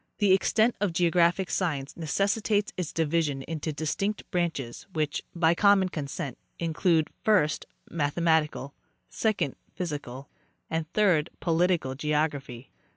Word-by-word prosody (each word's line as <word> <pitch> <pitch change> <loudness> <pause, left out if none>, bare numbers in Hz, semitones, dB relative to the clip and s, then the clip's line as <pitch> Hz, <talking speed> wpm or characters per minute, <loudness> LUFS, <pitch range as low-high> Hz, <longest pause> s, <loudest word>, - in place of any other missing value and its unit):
The 205 -2 +3
extent 220 +4 +3
of 200 -5 +1
geographic 175 +2 +2
science 145 -7 -1
necessitates 205 +5 0
its 175 -4 -3
division 155 -4 0
into 160 0 -4
distinct 175 +8 -2
branches, 160 -9 -2
which, 155 -2 -1
by 165 -1 +4
common 195 0 +4
consent, 140 -4 -5 0.2
include, 165 -1 +1
first, 185 -9 +2 0.2
mathematical; 155 -2 0 0.4
second, 190 - 0 0.2
physical, 145 -6 -5 0.4
and, 160 0 -2
third, 180 -8 +3
political 170 -5 +1
geography. 145 -4 -2
165 Hz, 110 wpm, -27 LUFS, 150-185 Hz, 0.4 s, by